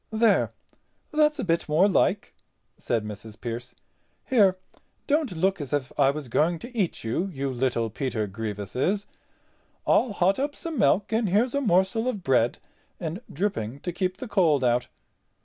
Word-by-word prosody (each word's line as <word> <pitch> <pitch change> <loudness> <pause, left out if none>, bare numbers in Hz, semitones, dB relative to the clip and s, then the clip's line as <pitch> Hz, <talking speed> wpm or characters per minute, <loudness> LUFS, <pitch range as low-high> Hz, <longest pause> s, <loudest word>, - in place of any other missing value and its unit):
"There, 220 -1 +3 0.6
that's 300 0 +3
a 270 - -2
bit 165 -3 0
more 165 +6 +5
like," 195 - +1 0.4
said 115 -3 -1
Mrs. 105 +1 -9
Pearce; 120 +1 -5 0.5
"here, 200 -7 +4 0.5
don't 285 - 0
look 190 +1 +1
as 145 0 -5
if 135 -3 -1
I 135 -2 +4
was 145 -1 -3
going 160 +8 +2
to 240 +8 -10
eat 195 -7 -1
you, 120 +12 -1
you 140 -7 -3
little 120 -3 0
Peter 120 -2 -2
Grievouses. 110 - -2 0.8
I'll 235 -4 +3
hot 195 +2 +2
up 285 +1 -1
some 330 -3 -4
milk 200 +3 +3
and 220 -2 +1
here's 225 +7 +2
a 280 - +1
morsel 195 +1 +2
of 210 -7 -2
bread 125 -4 +2 0.4
and 170 +4 -4
dripping 140 - -2
to 175 - -3
keep 185 +1 -1
the 260 - -6
cold 165 - +3
out. 120 0 +2
175 Hz, 165 wpm, -26 LUFS, 125-210 Hz, 0.8 s, more